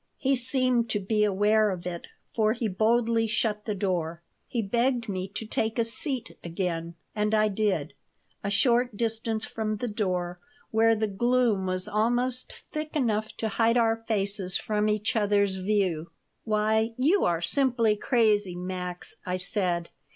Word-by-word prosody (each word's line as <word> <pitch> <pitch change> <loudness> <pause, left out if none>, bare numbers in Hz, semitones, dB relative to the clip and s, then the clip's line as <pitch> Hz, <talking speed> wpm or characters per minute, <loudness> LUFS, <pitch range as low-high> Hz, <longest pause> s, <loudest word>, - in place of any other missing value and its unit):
He 275 -1 +2
seemed 250 -2 +1
to 210 - 0
be 210 +2 +1
aware 210 +1 +3
of 180 -3 -4
it, 175 -1 -5 0.3
for 215 -1 +2
he 230 -1 -2
boldly 225 +3 +2
shut 210 -1 -1
the 210 - -2
door. 170 -4 -2 0.2
He 235 -3 -1
begged 235 +3 +1
me 185 -2 -3
to 225 - -3
take 220 +1 -1
a 230 - +2
seat 245 +1 -3
again, 170 -1 -3 0.2
and 210 +1 +1
I 215 0 +3
did, 205 0 0 0.5
a 200 - -1
short 235 +2 +2
distance 225 -1 -1
from 215 -1 -3
the 245 - -3
door, 180 -5 -2 0.3
where 225 0 +4
the 220 0 0
gloom 225 -1 +1
was 185 +1 -1
almost 240 +4 +1
thick 305 0 -6
enough 220 -6 0
to 225 - -1
hide 230 +2 +2
our 225 -1 +3
faces 200 -3 0
from 210 0 0
each 210 +2 0
other's 200 -2 +2
view 185 -4 0 0.4
"Why, 220 +1 +1
you 315 +10 +3
are 170 -1 +1
simply 230 +3 +2
crazy, 210 -5 +2
Max!" 180 0 -5
I 180 0 -2
said. 180 -2 -1
215 Hz, 160 wpm, -27 LUFS, 190-230 Hz, 0.5 s, where